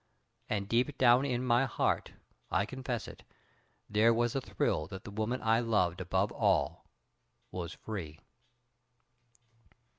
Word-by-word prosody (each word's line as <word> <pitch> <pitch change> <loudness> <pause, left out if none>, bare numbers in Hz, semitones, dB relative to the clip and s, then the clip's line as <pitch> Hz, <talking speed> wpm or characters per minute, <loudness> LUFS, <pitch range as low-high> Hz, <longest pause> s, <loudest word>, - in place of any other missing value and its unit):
And 100 -2 -1
deep 125 +6 +1
down 125 +1 +5
in 125 -2 -1
my 125 +2 +4
heart, 125 - -1 0.4
I 100 - +1
confess 130 -1 -4
it, - - -11 0.7
there 110 +2 +4
was 120 0 +1
a 135 - 0
thrill 75 -9 -1
that 95 +3 -8
the - - -8
woman 110 +5 -2
I 115 0 +4
loved 95 -7 +1
above 95 +3 0
all - - +1 0.6
was 85 -3 -5
free. 85 -8 -7
110 Hz, 130 wpm, -32 LUFS, 95-120 Hz, 0.7 s, down